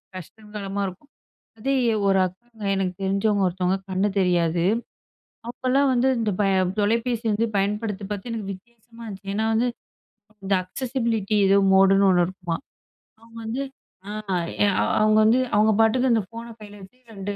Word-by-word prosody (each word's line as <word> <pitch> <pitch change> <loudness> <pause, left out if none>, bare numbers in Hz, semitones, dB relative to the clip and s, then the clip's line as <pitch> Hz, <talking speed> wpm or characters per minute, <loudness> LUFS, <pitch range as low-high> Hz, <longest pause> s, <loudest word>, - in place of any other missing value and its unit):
கஷ்டங்காலமா 200 +2 -7
இருக்கும். 195 +11 -11 0.5
அதே, 270 +5 0 0.3
ஒரு 195 -1 +4
அக்காங்க. 220 +5 -10
எனக்கு 190 -2 -1
தெரிஞ்சவங்க 200 +1 +1
ஒருத்தவங்க 180 +1 0
கண்ணு 190 +2 +1
தெரியாது. 175 -2 +1 0.9
அப்போலாம் 265 +3 +1
வந்து 255 +1 +2
இந்த 215 -2 0 0.5
தொலைபேசி 230 +3 0
வந்து 220 +3 +1
பயன்படுத்தி 205 0 -2
பாத்து 205 +3 -6
எனக்கு 215 -4 -4
வித்தியாசமா 235 +3 -17
இருந்துச்சு. 195 -1 -7
ஏன்னா, 220 +1 0
வந்து 235 +3 +2 0.8
இந்த 195 0 +1
அக்சஸிபிலிட்டி 230 -1 -2
ஏதோ 195 +1 +5 0.2
மோடுன்னு 195 +1 +5
1 180 -1 +4
இருக்குமாம். 185 +4 -5 0.6
அவங்க 230 0 -15
வந்து, 240 +5 -2 0.4
ஆ - - -5 0.9
அவங்க 215 0 +4
வந்து 230 +4 +4 0.2
அவங்க 215 +1 +4
பாட்டுக்கு 245 +3 +3
அந்த 225 - +2
ஃபோன 230 0 -8 0.2
கையில 205 -1 -12
வச்சு 190 +6 -15 0.2
2 200 0 -5
210 Hz, 140 wpm, -24 LUFS, 195-230 Hz, 0.9 s, ஏதோ